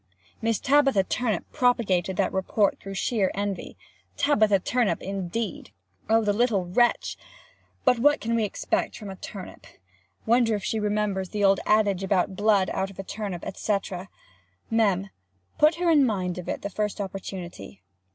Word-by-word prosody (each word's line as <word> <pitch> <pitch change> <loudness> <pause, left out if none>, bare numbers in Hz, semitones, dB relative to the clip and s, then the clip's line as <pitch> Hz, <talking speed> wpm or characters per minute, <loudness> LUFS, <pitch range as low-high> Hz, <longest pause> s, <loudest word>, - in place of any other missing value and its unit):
Miss 225 -1 +1
Tabitha 275 -7 +3
Turnip 215 -2 -1
propagated 195 -8 +1
that - - +1
report 195 +2 +1
through 195 0 -8
sheer 195 -1 +1
envy. 200 -1 -4 0.4
Tabitha 215 -8 +4
Turnip 235 +3 0
indeed! 195 +3 -4 0.4
Oh 225 0 +4
the 205 -1 +2
little 210 -4 +1
wretch! 240 +7 +1 0.7
But 250 -2 +4
what 290 +4 +4
can 230 +1 -2
we 230 -1 +2
expect 210 - -2
from 205 -2 -7
a - - -7
turnip? 190 0 -9 0.6
Wonder 230 -1 +3
if 205 - -5
she 220 - -1
remembers 205 -3 -1
the 210 -1 -2
old 195 -1 +5
adage 205 -3 +3
about 190 -1 +1
"blood 205 -2 +2
out 190 0 -1
of 195 - -14
a 195 - -5
turnip," 195 -3 -5
&c.? 210 -2 +1 0.9
[Mem. 200 -4 +1 0.5
put 305 +2 +5
her 345 0 +2
in 295 -3 +6
mind 185 -7 -1
of 180 - -7
it - - -4
the 200 - -4
first 210 +1 -2
opportunity. 180 - -7
205 Hz, 160 wpm, -26 LUFS, 190-230 Hz, 0.9 s, in